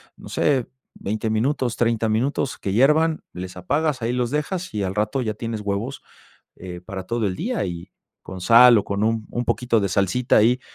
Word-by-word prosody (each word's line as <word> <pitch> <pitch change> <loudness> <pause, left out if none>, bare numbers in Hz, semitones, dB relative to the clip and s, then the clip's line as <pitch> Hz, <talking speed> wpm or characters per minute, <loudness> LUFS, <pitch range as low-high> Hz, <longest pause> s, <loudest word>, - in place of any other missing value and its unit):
no - - -12
sé, 135 -5 +1 0.3
20 110 +2 -3
minutos, 120 +2 0
30 115 -1 +1
minutos 125 +5 -1
que 95 - -3
hiervan, 155 +7 +3
les 90 0 -7
apagas, 145 - -1
ahí 115 +1 -1
los 125 -1 -1
dejas 170 - -3
y 105 -2 -1
al 95 0 -3
rato 105 +5 0
ya 110 -3 -2
tienes 115 0 -5
huevos, 105 +7 -3 0.6
eh, 90 -1 -8
para 95 0 -6
todo 115 +2 -1
el 90 -2 -2
día 240 +5 -2
y 85 -2 -6 0.3
con 95 - -8
sal 115 +4 +7
o 100 - -1
con 100 +1 -1
un 110 -1 0
un 120 - -2
poquito 120 -2 +1
de 100 - 0
salsita 100 +7 +1
ahí 120 +4 +3
115 Hz, 195 wpm, -22 LUFS, 100-130 Hz, 0.6 s, sal